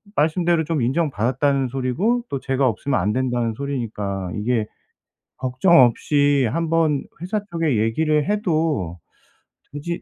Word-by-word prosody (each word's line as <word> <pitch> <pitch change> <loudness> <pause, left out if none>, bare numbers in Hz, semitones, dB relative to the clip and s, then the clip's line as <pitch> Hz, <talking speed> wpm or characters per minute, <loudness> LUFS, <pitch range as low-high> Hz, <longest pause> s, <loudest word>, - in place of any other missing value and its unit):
말씀대로 165 +2 +2
좀 160 -3 -1
'인정받았다.'는 135 0 0
소리고 135 - 0
또 140 - -3
'제가 135 0 0
없으면 130 +4 0
안 105 - 0
된다.'는 120 -2 0
소리니까 105 -8 -4
이게 110 +1 0 0.7
걱정 130 +7 +3
없이 140 +2 +3
한번 165 -2 +1 0.2
회사 185 +5 -1
쪽에 165 -7 0
얘기를 150 +8 +1
해도 160 - 0 0.8
되지 170 +4 -4
140 Hz, 280 characters per minute, -22 LUFS, 120-165 Hz, 0.8 s, 걱정